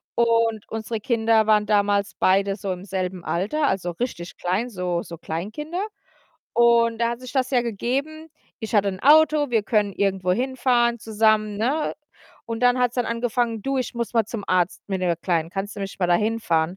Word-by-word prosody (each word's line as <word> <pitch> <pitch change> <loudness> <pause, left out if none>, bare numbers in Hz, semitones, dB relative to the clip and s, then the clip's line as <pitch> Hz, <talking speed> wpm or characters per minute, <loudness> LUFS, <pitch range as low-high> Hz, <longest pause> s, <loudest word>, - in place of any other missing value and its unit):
und 230 -2 +2
unsere 225 0 -4
Kinder 225 -1 +2
waren 210 -1 +4
damals 205 -1 +2
beide 195 +1 +2
so 195 -1 -4
im 180 +1 -6
selben 185 -2 -3
Alter, 220 - 0
also 185 -5 -1
richtig 175 -3 -5
klein, 190 +8 -1
so 180 -5 -2
so 170 - -9
Kleinkinder 220 - -4 0.7
und 235 -1 +4
da 235 0 +1
hat 235 +1 -5
sich 255 -1 -9
das 260 -2 0
ja 250 -3 +2
gegeben. 275 +8 -3 0.3
Ich 220 0 -5
hatte 205 -1 +4
'n 190 -1 -5
Auto, 300 -1 +5
wir 225 -3 +2
können 205 -2 +1
irgendwo 190 -2 0
hinfahren 245 0 +1
zusammen, 215 -1 +1
ne, 270 +9 0 0.5
und 230 -1 -4
dann 245 0 +4
hat's 245 -1 +1
dann 245 -2 0
angefangen: 230 -1 -1
„Du, 270 +2 -1
ich 255 - -3
muss 235 -1 -3
mal 225 -1 +3
zum 215 -2 -6
Arzt 180 0 +1
mit 190 -2 -2
der 175 -2 +1
Kleinen. 165 -1 -1
Kannst 195 +2 -4
du - - -6
mich 195 -1 -6
mal 180 - +1
dahinfahren?“ 175 -3 +1
220 Hz, 185 wpm, -23 LUFS, 190-240 Hz, 0.7 s, Auto